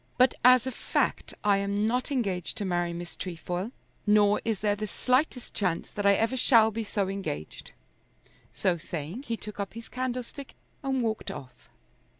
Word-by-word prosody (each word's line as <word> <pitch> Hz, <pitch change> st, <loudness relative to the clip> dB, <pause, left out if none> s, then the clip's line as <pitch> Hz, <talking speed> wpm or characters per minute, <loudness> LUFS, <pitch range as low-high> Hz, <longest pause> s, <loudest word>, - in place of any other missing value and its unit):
But 255 Hz, 0 st, +5 dB
as 255 Hz, 0 st, +7 dB
a 260 Hz, -, -1 dB
fact -, -, -1 dB
I 205 Hz, -1 st, +4 dB
am 200 Hz, +1 st, 0 dB
not 250 Hz, +5 st, 0 dB
engaged 195 Hz, -10 st, -1 dB
to 205 Hz, -, -2 dB
marry 175 Hz, -2 st, 0 dB
Miss 175 Hz, 0 st, -6 dB
Trefoil, 180 Hz, +3 st, -4 dB, 0.4 s
nor 210 Hz, 0 st, +5 dB
is 220 Hz, -4 st, -1 dB
there 205 Hz, -1 st, +2 dB
the 215 Hz, +1 st, -4 dB
slightest 255 Hz, +3 st, 0 dB
chance 180 Hz, -5 st, -1 dB
that 205 Hz, -1 st, 0 dB
I 200 Hz, -, +7 dB
ever 225 Hz, +5 st, +1 dB
shall 230 Hz, -3 st, +5 dB
be 225 Hz, +1 st, -3 dB
so 205 Hz, -2 st, -1 dB
engaged." 190 Hz, -, -5 dB, 0.8 s
So 175 Hz, -2 st, 0 dB
saying 165 Hz, -, -5 dB
he 230 Hz, -1 st, -1 dB
took 210 Hz, 0 st, -8 dB
up 200 Hz, +1 st, -4 dB
his 230 Hz, 0 st, -8 dB
candlestick 255 Hz, +2 st, -4 dB, 0.3 s
and 265 Hz, -3 st, 0 dB
walked 220 Hz, -1 st, -2 dB
off. 135 Hz, -4 st, -10 dB
210 Hz, 170 wpm, -28 LUFS, 190-245 Hz, 0.8 s, as